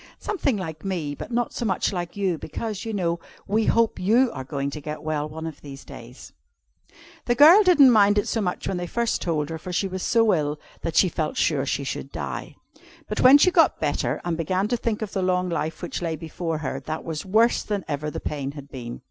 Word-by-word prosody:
"Something 285 Hz, -, -1 dB
like 160 Hz, -5 st, -6 dB
me; 175 Hz, -7 st, -2 dB
but -, -, -8 dB
not 240 Hz, 0 st, -1 dB
so -, -, -4 dB
much 200 Hz, -2 st, 0 dB
like 175 Hz, 0 st, -4 dB
you, 185 Hz, -5 st, 0 dB
because, 215 Hz, +6 st, -5 dB
you 225 Hz, -, -3 dB
know, 170 Hz, -5 st, -1 dB, 0.3 s
we 215 Hz, +2 st, +1 dB
hope 230 Hz, -1 st, +2 dB
you 230 Hz, +7 st, +3 dB
are 130 Hz, -, -5 dB
going 140 Hz, +1 st, -3 dB
to 150 Hz, -, -7 dB
get 150 Hz, +1 st, -6 dB
well 155 Hz, -1 st, -2 dB
one 160 Hz, +1 st, -7 dB
of 160 Hz, -3 st, -7 dB
these 140 Hz, -1 st, -10 dB
days. 125 Hz, -2 st, -12 dB, 0.9 s
The 240 Hz, -, +2 dB
girl 320 Hz, -, +8 dB
didn't 330 Hz, -10 st, +7 dB
mind 205 Hz, -2 st, +5 dB
it 205 Hz, -, +1 dB
so 225 Hz, -, -1 dB
much 180 Hz, -3 st, -2 dB
when 190 Hz, -, -1 dB
they 175 Hz, 0 st, -4 dB
first 235 Hz, +5 st, -1 dB
told 155 Hz, -3 st, -1 dB
her, 160 Hz, -, -5 dB
for 180 Hz, -, -7 dB
she 190 Hz, +2 st, 0 dB
was 185 Hz, 0 st, -5 dB
so 225 Hz, 0 st, +3 dB
ill 150 Hz, -2 st, -1 dB, 0.2 s
that 165 Hz, -2 st, -3 dB
she 185 Hz, -, +5 dB
felt 155 Hz, -3 st, -3 dB
sure 140 Hz, -3 st, +1 dB
she 140 Hz, -, -1 dB
should 135 Hz, +1 st, -5 dB
die. -, -, -5 dB, 0.5 s
But 210 Hz, -, -2 dB
when 260 Hz, +3 st, +9 dB
she 365 Hz, +5 st, +4 dB
got 345 Hz, -3 st, +4 dB
better, -, -, -1 dB
and 175 Hz, -1 st, 0 dB
began 185 Hz, +5 st, 0 dB
to 245 Hz, -, +1 dB
think 225 Hz, -2 st, -2 dB
of 205 Hz, -, -6 dB
the 195 Hz, -, -1 dB
long 180 Hz, 0 st, +1 dB
life 160 Hz, -1 st, -3 dB
which 175 Hz, -, -4 dB
lay 165 Hz, -2 st, -2 dB
before 165 Hz, +1 st, -4 dB
her, 135 Hz, -3 st, -4 dB
that 155 Hz, +4 st, -5 dB
was 160 Hz, -2 st, -4 dB
worse 220 Hz, +5 st, +3 dB
than 205 Hz, -3 st, -3 dB
ever 150 Hz, 0 st, -3 dB
the -, -, -5 dB
pain 140 Hz, -2 st, -4 dB
had 140 Hz, -1 st, -11 dB
been. 120 Hz, -3 st, -7 dB
175 Hz, 230 wpm, -24 LUFS, 150-215 Hz, 0.9 s, when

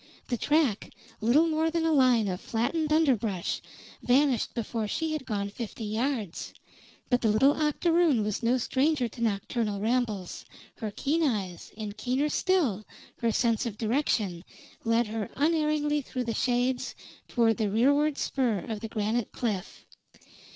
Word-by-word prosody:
The 245 Hz, -, 0 dB
track, 290 Hz, -6 st, +1 dB, 0.3 s
little 250 Hz, +9 st, +4 dB
more 320 Hz, 0 st, +1 dB
than 325 Hz, 0 st, 0 dB
a 325 Hz, -, +2 dB
line 255 Hz, -7 st, +4 dB
of 180 Hz, -1 st, -3 dB
flattened 300 Hz, +7 st, -1 dB
underbrush, 235 Hz, -, +1 dB, 0.4 s
vanished 260 Hz, -1 st, +2 dB
before 225 Hz, -1 st, -2 dB
she 320 Hz, +9 st, -2 dB
had 300 Hz, -4 st, -4 dB
gone 200 Hz, -3 st, -2 dB
fifty 225 Hz, +1 st, -6 dB
yards; 220 Hz, -, -3 dB, 0.6 s
but 245 Hz, -, +3 dB
the 225 Hz, -, +2 dB
little 220 Hz, +7 st, +5 dB
octoroon 310 Hz, -3 st, +2 dB
was 210 Hz, -1 st, -2 dB
no 240 Hz, +2 st, +2 dB
stranger 265 Hz, +2 st, +1 dB
to 235 Hz, -, -11 dB
nocturnal 210 Hz, -1 st, -1 dB
rambles, 215 Hz, -4 st, -1 dB, 0.3 s
her 220 Hz, -, -3 dB
keen 290 Hz, +10 st, -1 dB
eyes, 200 Hz, -, -2 dB
and, 210 Hz, -1 st, -6 dB
keener 260 Hz, +6 st, 0 dB
still, 295 Hz, -, +1 dB, 0.4 s
her 235 Hz, -2 st, +1 dB
sense 230 Hz, 0 st, +1 dB
of 210 Hz, -3 st, -6 dB
direction, 215 Hz, -, 0 dB, 0.4 s
led 230 Hz, +1 st, +2 dB
her 215 Hz, -1 st, -4 dB
unerringly 300 Hz, -1 st, +1 dB
through 255 Hz, -1 st, -4 dB
the 230 Hz, -1 st, -2 dB
shades 245 Hz, +2 st, 0 dB, 0.3 s
toward 230 Hz, -3 st, +2 dB
the 215 Hz, -3 st, 0 dB
rearward 285 Hz, +7 st, +3 dB
spur 250 Hz, -6 st, 0 dB
of 220 Hz, -2 st, -3 dB
the 225 Hz, -, -6 dB
granite 220 Hz, +1 st, -1 dB
cliff. 210 Hz, -6 st, -4 dB
240 Hz, 150 wpm, -28 LUFS, 215-290 Hz, 0.6 s, little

